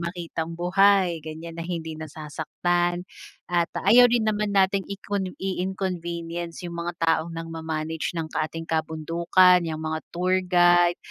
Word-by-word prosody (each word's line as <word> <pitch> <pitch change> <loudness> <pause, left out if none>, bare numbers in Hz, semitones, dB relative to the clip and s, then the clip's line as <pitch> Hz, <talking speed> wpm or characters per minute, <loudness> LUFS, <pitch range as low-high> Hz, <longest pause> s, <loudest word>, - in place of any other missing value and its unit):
makitang 170 -1 -4
buhay, 185 -1 +3
ganiyan, 160 +2 -8
na 165 - -4
hindi 165 -2 -4
nasasaktan 175 +3 -2 0.4
at 175 -1 +1
ayaw 245 +5 +6
rin 235 -2 +2
naman 210 -1 0
nating 195 0 +2
icon 200 -1 -3
i-inconvenience 175 -2 -4
yung 170 -1 -5
mga 175 +1 -3
taong 165 +1 +1
nang 165 0 -6
ma-manage 160 0 -4
ng 165 - -1
ating 165 +1 -3
kabundukan, 165 +3 +3
yung 155 0 -4
mga 155 0 -2
tour 185 +2 +1
guide, 175 -1 +4
175 Hz, 135 wpm, -25 LUFS, 165-185 Hz, 0.4 s, ayaw